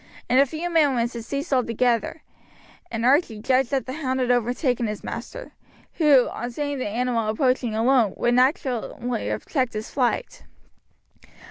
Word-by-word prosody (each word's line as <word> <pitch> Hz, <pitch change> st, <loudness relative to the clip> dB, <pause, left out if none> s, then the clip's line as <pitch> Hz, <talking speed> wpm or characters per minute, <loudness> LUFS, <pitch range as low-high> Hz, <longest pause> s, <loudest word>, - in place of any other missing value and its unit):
In 250 Hz, +2 st, +3 dB
a 275 Hz, -, +5 dB
few 315 Hz, +5 st, -4 dB
minutes 270 Hz, -7 st, +2 dB
it 235 Hz, -, -4 dB
ceased 280 Hz, +6 st, -4 dB
altogether, 245 Hz, +3 st, 0 dB, 0.7 s
and 230 Hz, 0 st, -3 dB
Archie 265 Hz, -4 st, +3 dB
judged 255 Hz, +3 st, +1 dB
that 270 Hz, -2 st, -1 dB
the 260 Hz, -, -5 dB
hound 265 Hz, -3 st, -2 dB
had 250 Hz, -1 st, +1 dB
overtaken 245 Hz, 0 st, 0 dB
his 210 Hz, -1 st, -5 dB
master, -, -, -7 dB, 0.5 s
who, 285 Hz, -6 st, +5 dB
on 240 Hz, -, -5 dB
seeing 285 Hz, +2 st, -3 dB
the 255 Hz, -, -2 dB
animal 230 Hz, 0 st, -1 dB
approaching 250 Hz, 0 st, 0 dB
alone, 230 Hz, -3 st, +2 dB
would 240 Hz, -, +1 dB
naturally 250 Hz, -2 st, 0 dB
have -, -, -3 dB
checked 260 Hz, -5 st, -1 dB
his 215 Hz, +1 st, -5 dB
flight. 260 Hz, -, -1 dB
250 Hz, 155 wpm, -24 LUFS, 235-275 Hz, 0.7 s, a